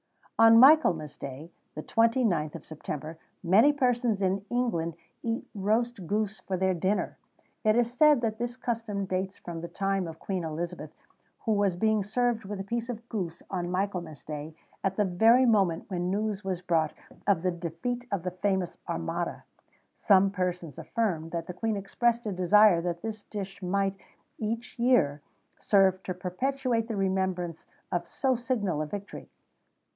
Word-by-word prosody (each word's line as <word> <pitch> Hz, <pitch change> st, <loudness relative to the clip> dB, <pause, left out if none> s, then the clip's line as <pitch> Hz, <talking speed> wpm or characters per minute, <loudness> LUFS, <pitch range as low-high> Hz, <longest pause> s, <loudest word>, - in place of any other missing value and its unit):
On 225 Hz, 0 st, +8 dB
Michaelmas 230 Hz, -, +6 dB
Day, 140 Hz, +5 st, -8 dB, 0.2 s
the 155 Hz, -, -5 dB
29th 225 Hz, -, +2 dB
of -, -, -9 dB
September, 155 Hz, +1 st, -6 dB, 0.2 s
many 205 Hz, +11 st, +6 dB
persons 245 Hz, -6 st, +1 dB
in 190 Hz, +1 st, +1 dB
England 170 Hz, -10 st, 0 dB, 0.3 s
eat 230 Hz, 0 st, -3 dB
roast 215 Hz, -1 st, 0 dB
goose 215 Hz, +1 st, -1 dB
for 190 Hz, -, -3 dB
their 190 Hz, 0 st, +2 dB
dinner. 185 Hz, +4 st, -1 dB, 0.4 s
It 215 Hz, -1 st, +4 dB
is 240 Hz, 0 st, +2 dB
said 300 Hz, -1 st, +6 dB
that 220 Hz, -2 st, -1 dB
this 240 Hz, +1 st, -3 dB
custom 225 Hz, -5 st, -2 dB
dates 190 Hz, +1 st, -2 dB
from 170 Hz, -1 st, -7 dB
the 170 Hz, -, -5 dB
time 195 Hz, -1 st, -1 dB
of 160 Hz, -1 st, -8 dB
Queen 185 Hz, 0 st, -3 dB
Elizabeth, 160 Hz, 0 st, -4 dB, 0.5 s
who 225 Hz, -, -1 dB
was 200 Hz, -3 st, +2 dB
being 220 Hz, +3 st, +2 dB
served 225 Hz, +2 st, 0 dB
with 200 Hz, 0 st, -5 dB
a -, -, -3 dB
piece 235 Hz, +4 st, -3 dB
of 235 Hz, -1 st, -6 dB
goose 180 Hz, -7 st, -4 dB
on 175 Hz, -2 st, -2 dB
Michaelmas 180 Hz, -5 st, -3 dB
Day, 150 Hz, +1 st, -6 dB, 0.3 s
at 195 Hz, -1 st, 0 dB
the 210 Hz, -, +2 dB
very 225 Hz, +8 st, +5 dB
moment 195 Hz, -8 st, +2 dB
when 175 Hz, -1 st, -1 dB
news 210 Hz, +1 st, -1 dB
was 185 Hz, -2 st, -3 dB
brought 160 Hz, -3 st, +1 dB, 0.3 s
of 190 Hz, -5 st, +3 dB
the 185 Hz, -, +2 dB
defeat 175 Hz, +9 st, -4 dB
of 200 Hz, -4 st, -1 dB
the 180 Hz, -, -2 dB
famous 185 Hz, -1 st, -1 dB
Armada. 80 Hz, 0 st, -3 dB, 0.5 s
Some 195 Hz, -1 st, +4 dB
persons 180 Hz, -6 st, -3 dB
affirm 180 Hz, -9 st, -1 dB
that 165 Hz, 0 st, -3 dB
the 180 Hz, -, -6 dB
Queen 220 Hz, +3 st, -1 dB
expressed 235 Hz, +4 st, 0 dB
a 210 Hz, -, -1 dB
desire 185 Hz, 0 st, +5 dB
that 170 Hz, +1 st, -3 dB
this 220 Hz, -1 st, -4 dB
dish 195 Hz, -3 st, -7 dB
might, 195 Hz, +1 st, 0 dB, 0.4 s
each 230 Hz, +3 st, -4 dB
year, 235 Hz, -, +3 dB, 0.4 s
serve 190 Hz, -2 st, +3 dB
to 185 Hz, -, -4 dB
perpetuate 230 Hz, +6 st, -1 dB
the 225 Hz, -, -3 dB
remembrance 190 Hz, -3 st, -1 dB, 0.2 s
of 175 Hz, -1 st, -1 dB
so 265 Hz, -1 st, 0 dB
signal 225 Hz, -, -1 dB
a 155 Hz, -, -2 dB
victory. 200 Hz, +4 st, -7 dB
195 Hz, 165 wpm, -28 LUFS, 175-225 Hz, 0.5 s, On